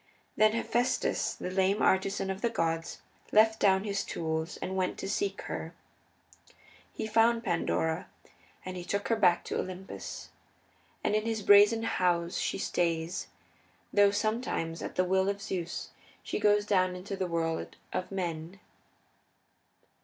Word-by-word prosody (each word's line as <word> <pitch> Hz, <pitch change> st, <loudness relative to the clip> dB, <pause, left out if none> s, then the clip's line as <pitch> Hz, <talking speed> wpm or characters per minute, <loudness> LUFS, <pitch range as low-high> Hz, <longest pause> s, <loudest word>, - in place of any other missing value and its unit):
Then 215 Hz, 0 st, +4 dB
Hephaestus, 240 Hz, +1 st, 0 dB
the 180 Hz, -, -5 dB
lame 190 Hz, +2 st, +2 dB
artisan 190 Hz, 0 st, +2 dB
of 190 Hz, +1 st, -6 dB
the 235 Hz, -, +2 dB
gods, 165 Hz, -5 st, -2 dB, 0.3 s
left 220 Hz, +1 st, +5 dB
down 190 Hz, -1 st, +4 dB
his 200 Hz, -2 st, -1 dB
tools 160 Hz, +1 st, -3 dB
and 190 Hz, -, -4 dB
went 185 Hz, -1 st, -1 dB
to -, -, -5 dB
seek 400 Hz, -, -1 dB
her. -, -, -5 dB, 1.2 s
He -, -, -4 dB
found 230 Hz, +1 st, +3 dB
Pandora, 165 Hz, -2 st, 0 dB, 0.6 s
and 185 Hz, 0 st, -5 dB
he 180 Hz, -, -5 dB
took 200 Hz, +3 st, -2 dB
her 230 Hz, -, +3 dB
back 180 Hz, -5 st, +3 dB
to -, -, -3 dB
Olympus. 185 Hz, +1 st, -6 dB, 0.7 s
And -, -, +1 dB
in 215 Hz, +1 st, +1 dB
his 220 Hz, -2 st, -2 dB
brazen 205 Hz, +3 st, +6 dB
house 175 Hz, -5 st, 0 dB
she -, -, -1 dB
stays, 170 Hz, +2 st, -1 dB, 0.7 s
though 205 Hz, -1 st, +6 dB
sometimes 205 Hz, -6 st, -1 dB
at -, -, -6 dB
the 185 Hz, -, +2 dB
will 190 Hz, +1 st, +2 dB
of 200 Hz, 0 st, -2 dB
Zeus 180 Hz, -4 st, -4 dB, 0.3 s
she -, -, -3 dB
goes 205 Hz, 0 st, +3 dB
down 185 Hz, -3 st, +2 dB
into 195 Hz, +2 st, -5 dB
the 190 Hz, -1 st, -2 dB
world 165 Hz, -1 st, -2 dB, 0.2 s
of 185 Hz, -, -3 dB
men. 175 Hz, -1 st, -4 dB
190 Hz, 145 wpm, -30 LUFS, 175-210 Hz, 1.2 s, brazen